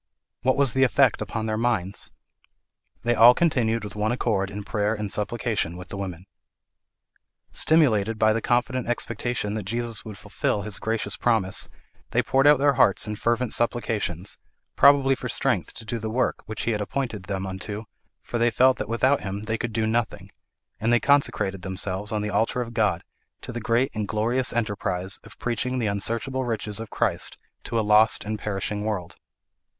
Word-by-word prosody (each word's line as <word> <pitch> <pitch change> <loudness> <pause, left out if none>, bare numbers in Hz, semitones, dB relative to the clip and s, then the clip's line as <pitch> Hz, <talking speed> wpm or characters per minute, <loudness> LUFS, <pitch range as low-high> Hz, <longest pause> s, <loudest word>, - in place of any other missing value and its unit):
What 130 +2 +2
was 140 -4 +3
the 130 - +3
effect 130 -2 +3
upon 110 +1 -3
their 110 0 -1
minds? 110 -5 -1 0.9
'They 120 - +2
all 120 +2 +8
continued 115 -9 +1
with 105 - -7
one 105 +2 0
accord 105 -6 0
in 100 +1 -6
prayer 105 0 0
and 105 -2 -4
supplication 105 -5 -1
with 90 +1 -10
the - - -6
women.' 90 -2 -6 1.3
Stimulated 115 -9 +3
by 110 0 +4
the 115 - -1
confident 125 +1 0
expectation 120 -2 -2
that 110 - -2
Jesus 115 0 -2
would 105 -3 -9
fulfil 100 - -2
his 105 0 -5
gracious 110 -2 -1
promise, 110 -6 +1 0.4
they - - +1
poured 135 +2 +3
out 150 0 +7
their 140 +1 +3
hearts 100 -6 +3
in 105 - -3
fervent 120 +2 0
supplications, 105 -6 -1 0.4
probably 140 -1 +6
for - - -4
strength - - 0
to 110 - -8
do 115 +1 -3
the 110 0 -4
work 125 +3 0
which 110 0 -4
he 120 - 0
had 105 -2 -1
appointed 110 -3 -3
them 95 -1 -3
unto, 100 +3 -5 0.4
for 120 - -3
they 120 +1 +4
felt 130 +3 +4
that - - -4
without 130 +4 +2
him 100 +1 -5
they 110 +1 -2
could 115 +1 -3
do 110 0 0
nothing, 110 +1 -2 0.5
and 115 +2 +1
they 120 - +5
consecrated 115 -9 +2
themselves 95 +2 -4
on 105 -1 -1
the 105 - -2
altar 110 +4 +1
of 120 -1 -4
God, 105 -4 +1 0.4
to 125 - -6
the 120 -1 -5
great 120 +3 +1
and 105 -2 -3
glorious 120 +5 +1
enterprise 100 -5 -1
of - - -15
preaching 125 +1 -2
the 120 - 0
unsearchable 115 +6 -1
riches 110 -3 -2
of 115 -1 -6
Christ - - -1 0.3
to 115 - -1
a 110 - 0
lost 110 +1 +4
and 105 0 -3
perishing 105 0 -2
world. 100 -6 -3
110 Hz, 185 wpm, -25 LUFS, 105-120 Hz, 1.3 s, all